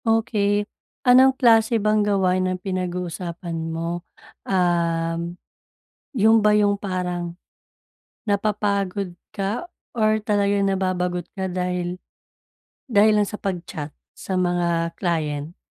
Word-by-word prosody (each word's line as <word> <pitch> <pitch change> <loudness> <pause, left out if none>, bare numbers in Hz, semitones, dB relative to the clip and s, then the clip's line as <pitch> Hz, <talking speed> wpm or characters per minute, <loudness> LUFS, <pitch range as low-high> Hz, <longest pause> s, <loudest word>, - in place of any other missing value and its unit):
Okey. 210 -2 +1 0.4
Anong 260 +1 +6
klase 230 -1 +4
bang 215 0 +2
gawain 185 -3 +2
ang 185 - -2
pinag-uusapan 175 -2 -4
mo? 165 +1 -3 0.5
Uhm, 170 -2 0 0.8
‘yon 225 -1 +5
ba 210 0 +4
yung 205 -1 +3
parang 180 -3 -3 0.9
napapagod 200 -2 0 0.2
ka 205 - -2 0.2
or 215 -2 +2
talaga 205 -1 +2
nababagot 180 -2 -1
ka 190 -2 -3
dahil, 180 0 -2 0.9
dahil 210 -1 +5
lang - - 0
sa 210 - -6
pag-chat 170 -6 -5 0.2
sa 190 - -4
mga 175 -2 0
client? 155 -2 -2
185 Hz, 105 wpm, -23 LUFS, 175-210 Hz, 0.9 s, Anong